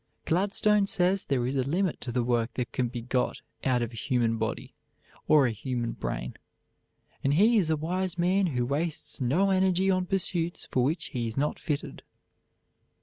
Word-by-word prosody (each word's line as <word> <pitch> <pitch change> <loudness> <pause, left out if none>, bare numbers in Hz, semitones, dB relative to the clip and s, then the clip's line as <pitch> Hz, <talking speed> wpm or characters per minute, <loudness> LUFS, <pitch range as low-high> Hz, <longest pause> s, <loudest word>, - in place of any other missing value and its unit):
Gladstone 200 +3 +2
says 185 +1 +2
there 130 -3 0
is 130 - -1
a 135 - +2
limit 170 +7 -1
to 120 - -4
the 120 0 0
work 120 -1 0
that 125 -2 -3
can 125 -2 0
be 120 0 -5
got 125 +1 -1 0.2
out 125 -2 +2
of 120 0 -5
a - - -8
human 115 -1 0
body, 110 0 -3 0.5
or 150 -3 +6
a 120 - +1
human 120 +2 -3
brain, - - -5 0.9
and 140 +1 +2
he 220 +7 +5
is 170 -5 0
a 160 - +2
wise 180 +3 -2
man 185 +2 +2
who 125 -6 -1
wastes 150 +3 -3
no 170 +11 +2
energy 190 0 +3
on 185 -1 0
pursuits 175 -3 -1
for 125 - +2
which 155 +7 -1
he 120 -5 -2
is 115 - -6
not 145 +2 0
fitted. 145 -2 -4
145 Hz, 185 wpm, -28 LUFS, 125-185 Hz, 0.9 s, or